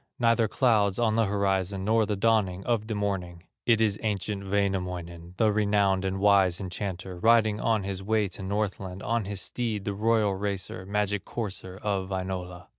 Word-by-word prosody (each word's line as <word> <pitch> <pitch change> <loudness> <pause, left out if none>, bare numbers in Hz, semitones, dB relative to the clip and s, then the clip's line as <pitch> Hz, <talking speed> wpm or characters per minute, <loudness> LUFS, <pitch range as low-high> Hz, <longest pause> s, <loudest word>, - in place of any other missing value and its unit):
Neither 115 -1 +3
clouds 105 -5 +2
on 110 -2 +2
the 115 0 +3
horizon, 95 -1 0
Nor 110 0 +3
the 105 - 0
dawning 100 -3 +1
of 115 -3 0
the 110 - -2
morning; 90 -4 -3 0.2
It 115 -2 +5
is 105 -2 +2
ancient 100 -2 -2
Wainamoinen, 90 -3 -2
The 110 -1 +3
renowned 100 -2 +2
and 95 0 -1
wise 95 -3 +4
enchanter, 95 -1 -5
Riding 110 0 +4
on 110 -3 +1
his 95 -1 -4
way 105 +1 +1
to 95 - -8
Northland; 95 -1 -3
On 115 -1 0
his 100 -1 -2
steed, 110 -3 -2
the 100 - -1
royal 110 0 +2
racer, 95 -1 -4
Magic 105 0 0
courser 95 -4 -5
of 95 -2 -1
Wainola." 90 -2 -4
100 Hz, 170 wpm, -27 LUFS, 95-110 Hz, 0.2 s, It